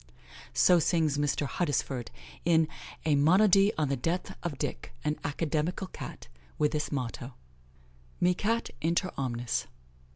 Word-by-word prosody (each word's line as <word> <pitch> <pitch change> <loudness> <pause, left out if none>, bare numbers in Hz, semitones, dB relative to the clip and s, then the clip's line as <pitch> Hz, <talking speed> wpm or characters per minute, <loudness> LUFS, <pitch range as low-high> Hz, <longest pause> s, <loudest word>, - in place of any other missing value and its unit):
So 180 -1 +6
sings 155 -3 +2
Mr. 145 0 +1
Huddesford, 140 -5 -1 0.3
in 160 -2 +4 0.4
a 155 - +3
"Monody 195 +7 +5
on 150 -3 0
the 140 - +1
death 165 +8 -2
of 160 -6 -3
Dick, - - -4
an 150 0 0
Academical 155 +5 -1
Cat," 185 - -9 0.3
with 150 -1 +2
this 150 -1 -2
motto: 125 -2 -4 0.8
"Mi 180 +1 +4
Cat 225 +5 -1
inter 170 +3 +1
omnes." 120 -3 -2
155 Hz, 130 wpm, -29 LUFS, 140-175 Hz, 0.8 s, So